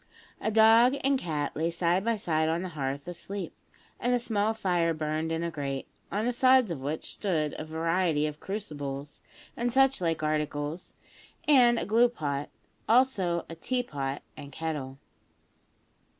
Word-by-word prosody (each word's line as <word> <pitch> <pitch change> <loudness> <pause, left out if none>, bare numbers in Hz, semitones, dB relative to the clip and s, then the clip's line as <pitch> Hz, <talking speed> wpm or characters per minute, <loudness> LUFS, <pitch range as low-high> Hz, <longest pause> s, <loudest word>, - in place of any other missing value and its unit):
A - - 0
dog 225 +4 +6
and 275 0 +3
cat 150 - -3
lay 160 +2 0
side 175 +2 +1
by 230 +1 +1
side 160 -6 0
on 165 +2 0
the 185 - -4
hearth 140 -2 -4
asleep, 190 +3 -5 0.5
and 245 0 +2
a - - +3
small 220 -3 0
fire 175 -5 +1
burned 155 +1 -2
in 165 +1 -1
a 170 - -2
grate, 140 -3 -4 0.2
on 210 +3 -1
the 245 - +1
sides 255 -4 +4
of 150 -6 -4
which 150 +4 -3
stood 160 -7 -1
a 155 - -5
variety 165 -1 +1
of 150 0 -4
crucibles 145 -8 -5 0.3
and 240 +1 -1
such 270 -2 +3
like 165 -2 0
articles 150 +1 -2 0.5
and 245 -5 +6
a - - -1
glue 230 +3 +4
pot; 145 - -3 0.4
also 210 -9 +3
a - - -8
tea 245 +10 -1
pot 140 - -4
and 145 -2 -10
kettle. 145 -4 -4
170 Hz, 165 wpm, -28 LUFS, 150-220 Hz, 0.5 s, dog